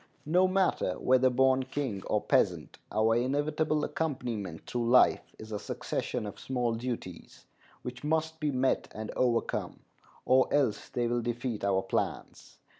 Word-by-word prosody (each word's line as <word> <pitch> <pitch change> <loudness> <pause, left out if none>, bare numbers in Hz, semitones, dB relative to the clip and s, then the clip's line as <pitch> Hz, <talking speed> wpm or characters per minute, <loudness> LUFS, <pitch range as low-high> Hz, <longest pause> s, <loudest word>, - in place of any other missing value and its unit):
No 180 +5 +4
matter 185 - +1
whether 130 0 +4
born 130 +1 +3
king 130 -6 -3
or - - +1
peasant, - - +1
our 110 +1 +3
inevitable 150 +5 0
accompaniment 120 - -3
through 120 -1 -2
life 125 +1 +4
is 110 0 -10
a 105 - -3
succession 105 - -3
of 100 - -7
small 125 -3 -1
duties, 115 -7 -6 0.4
which 125 +1 -7
must 160 +1 -1
be 150 - 0
met 130 -1 +1
and 110 0 -5
overcome, 120 -2 0 0.4
or 130 0 +4
else 135 -8 +1
they 120 - -1
will 120 0 0
defeat 120 -1 -3
our 95 -1 +2
plans. - - -4
125 Hz, 145 wpm, -30 LUFS, 115-145 Hz, 0.4 s, No